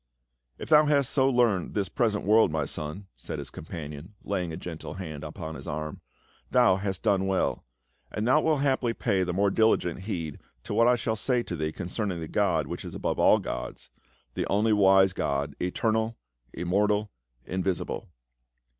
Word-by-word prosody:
" - - -50
If - - -8
thou 155 -1 +7
hast 140 -3 +2
so 135 -1 +3
learned 120 -8 +2
this 100 -3 0
present 110 -4 0
world, 110 +2 +5
my 80 0 0
son," 75 +7 -5
said - - -6
his - - -6
companion, 80 +2 -8
laying 90 -4 -2
a 80 - -5
gentle 85 -1 -7
hand 80 -5 -6
upon 80 +1 -6
his - - -9
arm, 75 +1 -4 0.5
"thou 120 -7 +4
hast 95 -1 -3
done 100 -3 +2
well; 95 -1 0 0.5
and 105 +2 -2
thou 150 +5 +5
wilt 155 -3 +2
haply 130 -4 +1
pay 95 -1 +1
the 90 -1 0
more 100 +2 +2
diligent 110 -6 +2
heed 85 -7 -4 0.2
to - - -5
what 115 - +4
I 125 - +5
shall 110 -2 -1
say 125 +2 0
to 90 - -5
thee 80 -1 -2
cou' 90 - -6
336 - - -7
PA - - -1
UL. 105 - 0
cerning 90 -3 -3
the 80 -1 -7
God 90 -7 +2
which - - -6
is - - -7
above - - -2
all - - +6
gods - - -6 0.2
— - - -38
the - - -2
only 105 +2 +2
wise 95 -2 +5
God, 70 -3 -2
eternal, 110 +5 0 0.3
immortal, 105 - 0 0.3
invisible." 95 -1 -2
95 Hz, 195 wpm, -27 LUFS, 80-110 Hz, 0.5 s, thou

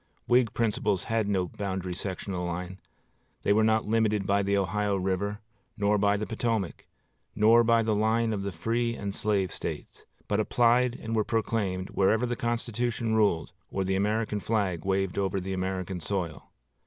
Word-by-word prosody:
Whig 120 -2 +4
principles 110 -4 0
had 110 -2 0
no 95 -3 +1
boundary 95 -2 -4
sectional 95 0 -4
line; 90 +2 -4 0.6
they 100 - +4
were 110 +1 +3
not 110 0 +2
limited 105 -2 +1
by 100 +1 +2
the 100 0 +1
Ohio 100 +1 0
river, 95 +2 -1 0.4
nor 105 0 +2
by 100 0 +3
the 105 - -2
Potomac, 115 -5 -2 0.5
nor 115 +3 +6
by 115 0 +4
the 110 -1 +1
line 110 +2 +2
of 100 - -2
the 100 0 -3
free 115 +7 -1
and 100 -2 -4
slave 100 -3 0
States, - - -6 0.2
but - - +1
applied 120 +1 +3
and 115 0 -4
were 110 - +3
proclaimed 105 -5 -1
wherever 110 +5 +2
the 120 0 -1
Constitution 120 -1 -1
ruled 100 -8 +2 0.2
or 95 - -1
the 95 0 0
American 105 +2 0
flag 100 -6 -1
waved 95 -1 0
over 95 0 0
the 95 +1 -4
American 95 -1 -3
soil. 85 -2 -4
105 Hz, 165 wpm, -28 LUFS, 95-115 Hz, 0.6 s, nor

